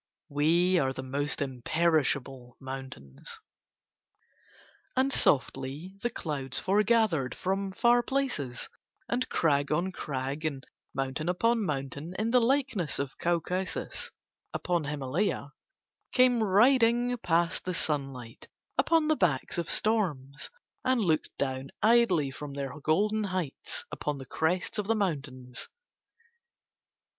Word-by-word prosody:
"We 170 +5 +3
are 135 -3 +1
the 130 - -6
most 145 +2 -2
imperishable 135 -2 0
mountains." 130 - -8 1.6
And 265 +1 +2
softly 140 +5 +1
the 240 - 0
clouds 140 - -3
foregathered 205 - +2
from 195 +1 -1
far 240 +5 +4
places, 240 - -2 0.4
and 250 +2 -1
crag 145 -3 +2
on 175 +5 +1
crag 140 -2 -4
and 140 -4 -3 0.3
mountain 135 +5 -2
upon 230 +5 +2
mountain 145 +1 -4
in 220 +2 0
the 250 0 +5
likeness 245 - +1
of 140 -1 -3
Caucasus 175 +2 -1 0.5
upon 175 -4 0
Himalaya 145 +2 -1 0.6
came 250 -2 +4
riding 240 +3 +4
past 170 -3 +1
the 180 -1 -2
sunlight 135 -7 -3 0.3
upon 325 -2 +4
the 310 - +4
backs 170 - +1
of 170 - -3
storms 150 -11 0 0.3
and 255 -1 +2
looked 165 -7 +1
down 135 0 -2
idly 215 - +4
from 145 +1 -7
their 135 -2 -3
golden 210 +8 +2
heights 185 -7 -4
upon 150 -1 -3
the 135 - -8
crests 175 - -1
of 205 - -2
the 225 - +3
mountains. 140 - -3
165 Hz, 115 wpm, -29 LUFS, 135-210 Hz, 1.6 s, the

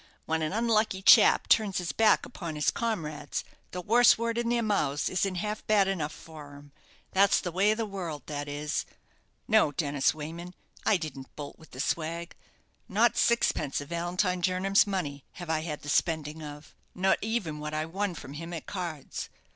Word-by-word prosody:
"When 160 0 0
an 155 - -1
unlucky 215 -3 +1
chap - - +7
turns 210 -4 +3
his 180 -2 -2
back 225 -1 +4
upon 170 -9 -6
his 150 - +2
comrades, 155 -11 -3 0.3
the 180 - -5
worst 240 +4 +6
word 230 0 -1
in 235 0 -1
their 240 -1 +1
mouths 150 -10 0
isn't 185 +1 0
half 210 +3 -3
bad 205 -3 +4
enough 165 -6 -1
for 150 -2 -11
him. 145 0 -14 0.4
That's 195 +1 +4
the 180 - -4
way 195 +4 +3
of 215 - +2
the 225 - -1
world, 175 -8 -5
that 145 -1 -4
is. 145 +1 -3 0.6
No, 215 -9 +4
Dennis 145 -2 +1
Wayman; 170 +4 -7 0.3
I 210 - +5
didn't 150 -6 -8
bolt 145 -1 -8
with 160 - -16
the 130 - -11
swag 170 +4 -2 0.5
not - - +3
sixpence 155 -11 +2
of 145 0 -8
Valentine 180 +2 -1
Jernam's 185 +3 +3
money 150 -9 -3
have 175 -3 -6
I 160 - +1
had 155 -2 -5
the - - -9
spending 160 0 0
of; 150 0 -9 0.2
no 190 +1 +3
even 205 -9 -2
what 150 0 -4
I 155 0 -1
won 190 +2 -2
from 140 -2 -9
him 165 +3 -7
at 165 - -6
cards. 170 -7 -5
170 Hz, 185 wpm, -29 LUFS, 150-200 Hz, 0.6 s, chap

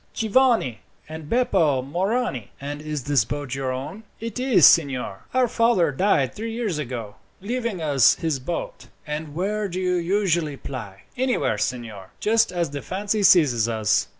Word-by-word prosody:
"Giovanni 225 - +2 0.3
and 155 -1 -9
Beppo 170 - +2
Morani." 180 - -2
"And 145 +1 -6
is 150 -3 -4
this 140 -4 +2
boat 145 +1 -5
your 135 -1 -2
own?" 135 +11 -6 0.2
"It 230 +2 -5
is, 250 - +5
signor. 130 -11 +3
Our 255 -1 +2
father 225 -9 +2
died 140 -4 +1
three 225 +1 -5
years 220 -9 -2
ago, 115 -7 -6 0.2
leaving 230 -3 -3
us 140 -6 +4
his 160 -5 -2
boat." - - -5 0.2
"And 150 -1 -5
where 205 +4 -1
do 180 +1 -4
you 180 -1 +1
usually 170 -5 0
ply?" 110 -10 -8
"Anywhere, 255 0 0
signor, 110 -6 -4
just 225 -1 +2
as 170 -4 -2
the 145 -1 -5
fancy 205 +3 -2
seizes 135 - +4
us. 110 -2 +1
160 Hz, 155 wpm, -23 LUFS, 135-210 Hz, 0.3 s, is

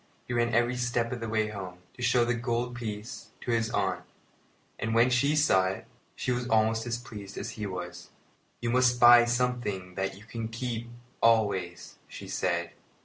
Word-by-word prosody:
He - - -3
ran 120 0 +1
every 120 +1 +2
step 120 -1 0
of 125 - -3
the 115 -1 -4
way 110 -1 +1
home, 95 -4 -7 0.2
to - - -12
show 120 0 +3
the 120 - +1
gold 120 +1 -2
piece 105 -3 -6
to - - -3
his 115 -1 +1
aunt; - - 0 0.8
and, 115 0 -1
when 120 +2 +5
she 140 +4 +3
saw 95 -12 +4
it, 95 - -4 0.3
she - - -2
was 125 0 -1
almost 110 0 +2
as 115 -1 -1
pleased 105 -5 -9
as - - -4
he 105 -2 -5
was. 90 -2 -7 0.5
"You 120 -1 -1
must 125 0 +3
buy 120 0 +9
something 120 -7 -1
that 95 +1 -3
you 100 - -14
can 115 0 -5
keep 115 0 -4 0.3
always," 100 -6 +1
she - - -9
said. 85 -2 -1
115 Hz, 185 wpm, -29 LUFS, 105-120 Hz, 0.8 s, buy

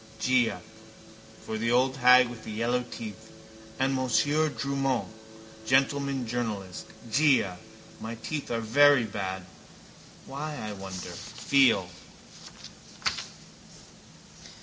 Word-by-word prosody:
For 110 - -4
the 115 +1 0
old 130 +2 +2
hag 125 0 +7
with 120 -2 -9
the - - -7
yellow 120 +3 0
teeth. 110 -1 -8 0.5
And 135 +1 +1
Monsieur 145 +4 +2
Drumont, 135 -3 -1 0.6
gentleman 135 0 +2
journalist. 110 -6 -4 0.2
Già. 130 -9 +3 0.4
My 115 +1 -6
teeth 145 +6 -5
are 115 -1 -1
very 140 +3 +5
bad. 95 -3 -4 0.8
Why, 150 +2 -5
I 110 -4 -5
wonder. 95 -2 -7
Feel. 130 -9 +2
125 Hz, 95 wpm, -28 LUFS, 110-140 Hz, 0.8 s, hag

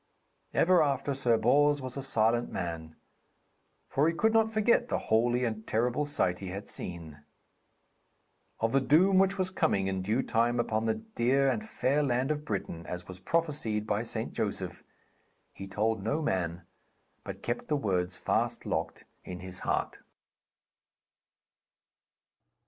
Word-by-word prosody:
Ever 180 0 +4
after 140 -1 0
Sir 125 -4 +2
Bors 145 +6 +3
was 130 -2 -6
a 140 - -3
silent 120 -2 +1
man, 80 -3 -5 0.9
for 145 +3 +2
he 165 - -3
could 220 +5 +2
not 225 0 +4
forget 225 +2 +2
the - - 0
holy 120 +3 +1
and 110 -1 -4
terrible 125 +6 0
sight 90 -11 0
he 95 - -6
had 100 +3 -6
seen. 80 -4 -6 1.4
Of 115 +1 +1
the 135 - +3
doom 185 +8 +5
which 195 +1 +3
was 185 0 0
coming 155 - +1
in 95 -1 -1
due 110 +7 0
time 120 +1 +1
upon 110 -1 0
the 110 - +2
dear 135 - +1
and 215 - -2
fair 150 - 0
land 130 0 +1
of 150 0 -3
Britain, 95 - -4
as 90 0 -6
was 95 -1 -9
prophesied 140 - 0
by 105 0 0
St. 115 - -3
Joseph, - - -3 0.7
he 95 - -8
told 110 +2 0
no 125 +10 -1
man, 90 - -1 0.6
but - - -8
kept 120 +1 -3
the 150 - +1
words 90 -6 -1
fast - - -1
locked - - -3 0.2
in 90 -1 -7
his 90 -1 -6
heart. - - -2
120 Hz, 150 wpm, -30 LUFS, 95-145 Hz, 1.4 s, doom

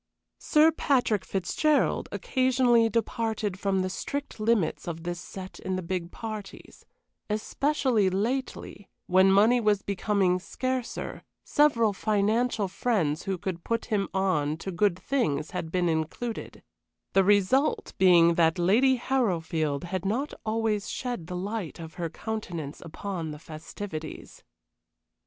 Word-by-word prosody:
Sir 310 +1 +4
Patrick 250 - +1
Fitzgerald 285 - +1
occasionally 250 -3 +3
departed 220 -3 -1
from 195 -1 +1
the 185 - -2
strict 285 +6 -5
limits 215 -8 +1
of 165 -1 -5
this 175 0 -3
set 185 +1 -9
in 190 0 -3
the 185 - -3
big 175 0 -3
parties 215 -3 -8 0.4
especially 230 0 +1
lately, 210 0 -3 0.2
when 190 +1 +5
money 215 +5 +5
was 210 -2 +2
becoming 195 -2 +1
scarcer, 255 +5 -4 0.2
several 235 -8 +3
financial 215 +2 +1
friends 180 -7 0
who 195 -1 -1
could 175 -1 -5
put 230 0 -1
him 195 -2 +1
on 170 -6 0
to 190 +3 -5
good 190 0 +2
things 185 - -1
had 170 -3 -4
been 180 -1 +1
included, 165 +9 -3 0.5
the 195 - +5
result 205 +8 +2
being 170 -2 +6
that 165 0 +3
Lady 225 +10 +4
Harrowfield 165 - 0
had 180 +1 -3
not 240 +9 -1
always 215 -2 -1
shed 245 -10 -4
the 180 - -4
light 200 -2 -4
of 160 -1 -9
her 170 -2 -3
countenance 170 -7 -5
upon 170 0 -5
the 150 - -6
festivities. 155 +1 -8
195 Hz, 130 wpm, -27 LUFS, 175-230 Hz, 0.5 s, being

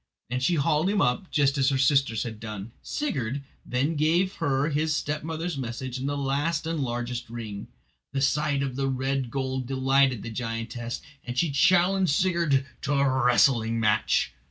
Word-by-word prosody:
And 125 +1 -1
she 170 +7 +2
hauled 155 +3 +2
him 205 0 +1
up 125 +5 +1
just 140 -2 +2
as 135 0 +4
her 135 - +1
sisters 135 -5 +2
had 110 -3 -6
done. 105 -1 -7
Sigurd 140 - -3 0.2
then 140 +6 -1
gave 170 +5 +2
her 140 +2 +1
his 155 +1 +1
stepmother's 155 +1 -3
message 125 +1 -4
and 135 +2 -2
the 145 - -2
last 145 +3 0
and 165 -1 -2
largest 120 -2 -3
ring. 110 -4 -6 0.4
The 135 0 -1
sight 145 0 +1
of 130 -2 -3
the 135 0 0
red 135 -1 -1
gold 130 -1 -2
delighted 135 -2 +2
the 115 - -6
giantess, 115 +1 -4 0.2
and 125 0 -6
she 165 +1 +2
challenged 180 +3 +3
Sigurd 170 -7 +2 0.2
to 145 - -1
a 135 -2 +2
wrestling 115 -1 +3
match. 105 -2 +2
135 Hz, 170 wpm, -26 LUFS, 125-150 Hz, 0.4 s, as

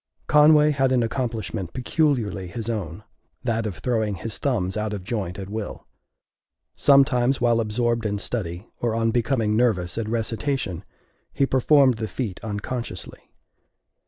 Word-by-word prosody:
Conway 150 0 +6
had 135 -2 +1
an 125 -2 +3
accomplishment 110 -7 -3
peculiarly 125 - 0
his 115 +5 -4
own 100 -3 -5 0.4
that 115 -3 0
of 100 - -5
throwing 110 -5 -1
his 105 +5 -6
thumbs 100 -9 0
out 105 0 -2
of 100 -3 -5
joint 95 -4 -3
at 95 -1 -6
will. 105 +1 -6 0.9
Sometimes 135 -2 +4
while 120 -1 +3
absorbed 115 +1 0
in 105 0 -2
study, 100 -3 -3
or 115 -2 0
on 115 0 +1
becoming 115 -2 +1
nervous 110 -6 +1
at 110 -1 -3
recitation, 115 - -2 0.5
he 140 - +2
performed 135 -1 +4
the 110 0 -3
feat 105 -2 -4
unconsciously. 105 -2 -5
115 Hz, 140 wpm, -24 LUFS, 105-125 Hz, 0.9 s, Conway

